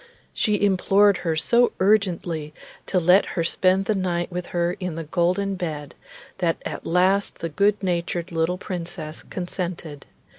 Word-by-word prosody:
She 210 -1 +1
implored 200 0 +4
her 165 -3 -1
so 235 +10 +3
urgently 175 -6 +1 0.3
to 185 - +2
let 180 +3 +4
her 170 - +2
spend 185 +3 +2
the 215 - +1
night 180 -2 -1
with 180 0 -4
her 175 0 0
in 180 -4 -4
the 165 - -4
golden 180 +5 0
bed, 155 -6 -5 0.5
that 170 -3 +1
at - - -5
last 185 +4 +2
the 165 - -4
good 200 +6 +1
natured 175 -1 -2
little 165 +2 0
Princess 170 -4 -6
consented. 175 -5 -5
180 Hz, 150 wpm, -23 LUFS, 165-195 Hz, 0.5 s, implored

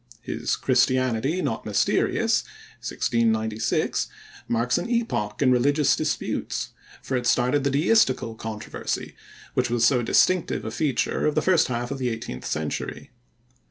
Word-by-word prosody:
His - - -2
Christianity 130 +6 +1
not 110 - -2
Mysterious 105 -2 +1 0.4
(1696) 110 -2 0 0.4
marks 120 +5 +1
an 175 - -5
epoch 145 - -1
in 130 - +4
religious 140 +4 +3
disputes, - - -2 0.3
for 135 - -2
it 125 -1 -1
started 125 +4 +2
the 140 - +2
deistical 140 - +2
controversy 110 -1 -5 0.4
which 125 -1 +1
was 120 -1 +2
so 125 -1 +4
distinctive 180 +9 +2
a - - -3
feature 145 -3 0
of 150 - 0
the - - +3
first 185 -3 +4
half 120 0 -3
of 140 - -4
the 125 -1 0
eighteenth 110 - -6
century. 75 -1 -4
125 Hz, 135 wpm, -25 LUFS, 115-140 Hz, 0.4 s, in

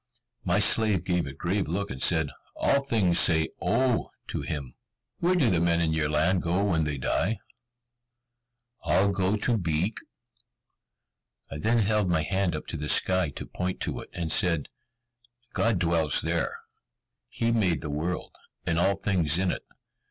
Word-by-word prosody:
My 90 0 +1
slave 105 -3 +4
gave 90 -4 0
a - - -5
grave 90 +8 -2
look, 100 +5 -3
and 65 0 -7
said, 80 -4 +2 0.2
"All 140 0 +2
things 105 -10 +2
say 80 -1 +4
'O' 130 -3 +1 0.2
to - - -3
him." 70 -5 -5 0.5
"Where 180 +2 +2
do 135 - +3
the 85 -3 +2
men 85 0 +2
in 80 -2 +1
your 80 -2 0
land 80 +5 +2
go 90 +4 0
when 80 -6 +1
they 75 -1 -2
die?" 95 - 0 1.4
"All 90 +5 +2
go 95 +2 0
to 115 +1 +1
Beek." 85 +4 -1 1.5
I 70 - -5
then 115 +9 +2
held 105 -2 +1
my 80 -3 +1
hand 95 -1 0
up 75 - -6
to 80 - -4
the 75 0 -4
sky 95 -3 +2
to 70 - -8
point 90 0 -4
to - - -1
it, - - -10
and 85 -2 -3
said, 85 -5 +2 0.8
"God 115 -3 +1
dwells 85 -3 +2
there. - - -1 0.7
He 115 0 -1
made 100 -8 +1
the 75 -2 -5
world, 80 +5 -3 0.3
and 85 0 +1
all 100 +3 +2
things 90 -5 +1
in 95 -1 +1
it. - - -4
90 Hz, 165 wpm, -27 LUFS, 80-100 Hz, 1.5 s, slave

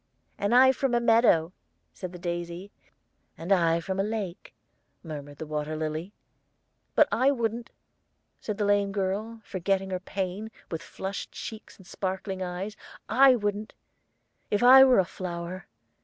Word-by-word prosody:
"And 205 +4 +1
I 260 +1 +8
from 265 -1 0
a - - +4
meadow," 225 -8 +4 0.4
said 185 -2 -7
the 180 - -9
daisy. 175 +2 -5 0.7
"And 170 +4 -6
I 170 -3 +4
from 190 +3 -4
a - - +3
lake," 205 -4 -5 0.5
murmured 145 -3 -8
the 160 - -6
water 150 0 -3
lily. 155 +4 -4 0.8
"But - - +6
I 260 +3 +3
wouldn't," 235 -3 -2 0.7
said 210 -2 -4
the 210 - 0
lame 200 -1 +2
girl, 205 +3 -3
forgetting 190 +1 -1
her 185 - -1
pain, 190 +3 -4 0.2
with 165 -1 -3
flushed 190 +2 -6
cheeks 220 -1 -8
and 190 - -17
sparkling 190 +1 -4
eyes 185 +3 -4 0.3
"I 260 +3 +6
wouldn't, 205 -1 -3 0.7
if 205 +3 +1
I 260 +2 +10
were 260 -2 +5
a 190 - +4
flower. 175 0 -6
195 Hz, 150 wpm, -27 LUFS, 175-220 Hz, 0.8 s, I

